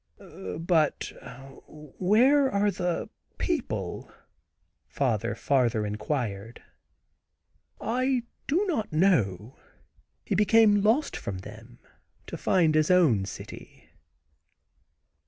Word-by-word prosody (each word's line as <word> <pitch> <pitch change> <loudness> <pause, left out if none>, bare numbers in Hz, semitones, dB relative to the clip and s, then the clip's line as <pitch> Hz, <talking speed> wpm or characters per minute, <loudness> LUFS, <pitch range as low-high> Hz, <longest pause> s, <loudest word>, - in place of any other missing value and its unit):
"But 165 -2 0 0.5
where 215 - +2
are 205 -1 +1
the 180 -2 -2 0.3
people?" - - -3 0.8
father 115 -6 -1
farther 120 -4 +1
inquired. 105 0 -4 1.2
"I 255 +1 0 0.2
do 345 +9 +1
not 245 - -2
know. 130 - +1 0.7
He - - -2
became 210 +1 +4
lost 230 +9 +1
again - - -10
from 100 - -4
them 115 +4 -12 0.5
to - - -7
find 170 -5 +2
his 155 0 +2
own 155 - +4
city." - - -11
165 Hz, 90 wpm, -27 LUFS, -, 1.2 s, became